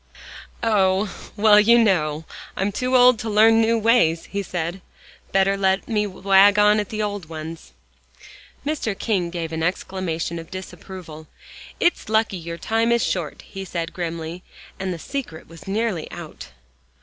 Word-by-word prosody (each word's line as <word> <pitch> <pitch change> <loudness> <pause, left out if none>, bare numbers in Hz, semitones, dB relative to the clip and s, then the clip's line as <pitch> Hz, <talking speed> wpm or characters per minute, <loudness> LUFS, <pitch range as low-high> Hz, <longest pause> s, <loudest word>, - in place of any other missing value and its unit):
"Oh! 195 -2 +2 0.2
well, 210 0 +6
you 230 +3 +6
know, 160 -8 +1 0.3
I'm 195 +2 0
too 255 +5 -1
old 250 -2 +6
to 225 - -4
learn 225 +2 +5
new 230 +1 +2
ways," 220 -8 +3
he 200 - -3
said. 175 0 -4 0.5
"Better 195 +1 +3
let 190 0 +1
me 210 -2 0
wag 195 +1 +4
on 210 +1 +5
at 210 - -3
the 215 -1 -2
old 205 -6 -4
ones." 160 - -8 0.9
Mr. 270 -9 -2
King 190 -6 -1
gave 170 -2 -4
an 160 - -3
exclamation 170 -1 -2
of 165 - -10
disapproval. 185 -4 -9 0.5
"It's 345 -10 +1
lucky 220 -3 +1
your 170 0 -6
time 225 +5 0
is 235 0 +3
short," 175 -5 -3
he 195 - -8
said 170 -3 -4
grimly, 170 0 -5 0.4
and 190 -1 -2
the 175 - -4
secret 235 - -6
was 165 +3 -14
nearly 205 -4 -2
out! - - -9
195 Hz, 155 wpm, -22 LUFS, 170-215 Hz, 0.9 s, well